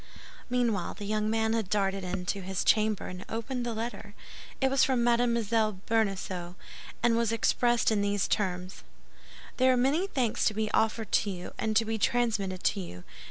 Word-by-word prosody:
Meanwhile, 235 -7 0
the 205 - -7
young 215 +1 0
man 220 0 +1
had 220 -5 -1
darted 195 -2 0
in 180 0 -4
to 195 +2 -2
his 190 0 -2
chamber, 215 -1 +2
and 180 +1 -7
opened 240 +3 -3
the 235 -2 -3
letter. 220 -2 -5 0.4
It 265 -1 +2
was 270 - +4
from 255 -3 +2
Mme. 235 0 +3 0.5
Bonacieux, 190 -5 -1 0.5
and 240 -1 +4
was 230 -1 +1
expressed 240 +1 +2
in 210 -2 +2
these 200 -1 0
terms: 185 -2 -2 0.7
"There 260 0 +5
are 255 - +3
many 285 +10 +2
thanks 250 - 0
to 215 - +2
be 215 0 -1
offered 220 -1 0
to 205 - +2
you, 180 -2 -6
and 220 -1 -1
to 225 +1 +4
be 220 0 -2
transmitted 205 -6 0
to 205 - +1
you. 90 - -8
220 Hz, 180 wpm, -29 LUFS, 195-235 Hz, 0.7 s, There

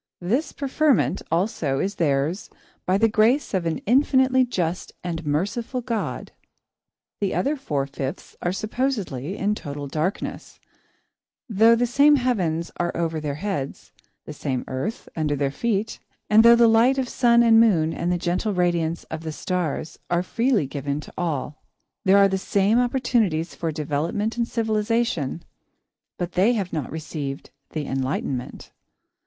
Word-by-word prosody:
This 250 - 0
preferment, 275 - +1
also, 165 -6 0
is 195 +7 -1
theirs 150 +3 0 0.4
by 185 +1 +3
the 225 +2 +4
grace 225 +6 +2
of 180 -3 0
an 165 - -1
infinitely 260 +1 +4
just 180 -7 -3
and 170 -2 -4
merciful 205 - -1
God. 230 -2 -3 0.9
The 200 -2 -1
other 285 +3 +1
four 150 - -2
fifths 140 +3 -6
are 175 - 0
supposedly 205 - -2
in 205 +2 +1
total 145 -7 -6
darkness, 155 +7 -4 0.9
though 225 +1 +5
the 240 +1 +1
same 285 +5 +5
heavens 185 - 0
are 175 0 0
over 165 -2 -1
their 150 -2 -3
heads, 150 -6 -4 0.3
the - - -7
same 130 -2 -3
earth 135 +13 -4
under 150 -2 0
their 140 -1 0
feet, 225 +4 -2 0.3
and 215 +1 +8
though 235 0 +8
the 235 0 +5
light 230 +4 +4
of 260 -2 0
sun 235 -1 +4
and 225 -1 +6
moon 170 -8 +3
and 175 - -2
the 180 - +1
gentle 180 +4 -1
radiance 170 -2 0
of 160 0 -4
the 160 -1 -5
stars 165 -1 -3
are 175 0 +1
freely 230 - +1
given 140 +1 -3
to - - -13
all. 150 -3 -3 0.4
There 195 +1 +6
are 200 0 +6
the 190 0 -1
same 200 +4 +2
opportunities 235 -10 +1
for 165 -2 -3
development 155 +8 -2
and 235 -1 -1
civilisation, 220 - -1 0.7
but 175 0 -3
they 195 +8 +3
have 195 -6 -3
not 150 -5 -3
received 150 -3 -5 0.2
The 155 -2 -3
Enlightenment. 130 -1 -3
185 Hz, 150 wpm, -23 LUFS, 155-230 Hz, 0.9 s, and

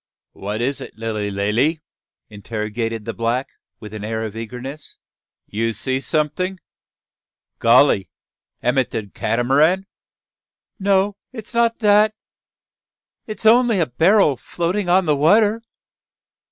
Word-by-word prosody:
"Wha 100 +1 -5
is 120 +6 -1
it, - - -10
Lilly 110 -2 -3
Lally?" 105 +11 0 0.5
interrogated 110 +1 -4
the 115 - -4
black, 115 +4 -1 0.3
with 105 -1 -10
an 105 -1 -6
air 110 +1 -3
of 110 -1 -7
eagerness; 125 +6 -7 0.5
"you 115 +2 -2
see 130 +5 -1
someting. 160 +6 -1 1.0
Golly! 115 -4 +4 0.5
am 125 +3 +2
it 130 - 0
de 110 - -3
Cat'maran?" 145 - +1 0.9
"No, 195 0 +1
it 225 -5 -8
is - - -9
not 235 0 +2
that. 210 +1 +5 1.1
It's 215 0 -7
only 235 -2 +5
a 165 - +3
barrel 160 - +3
floating 175 - -2
on 185 +1 +4
the 150 -2 +2
water." 210 +9 +3
135 Hz, 125 wpm, -20 LUFS, 115-190 Hz, 1.1 s, that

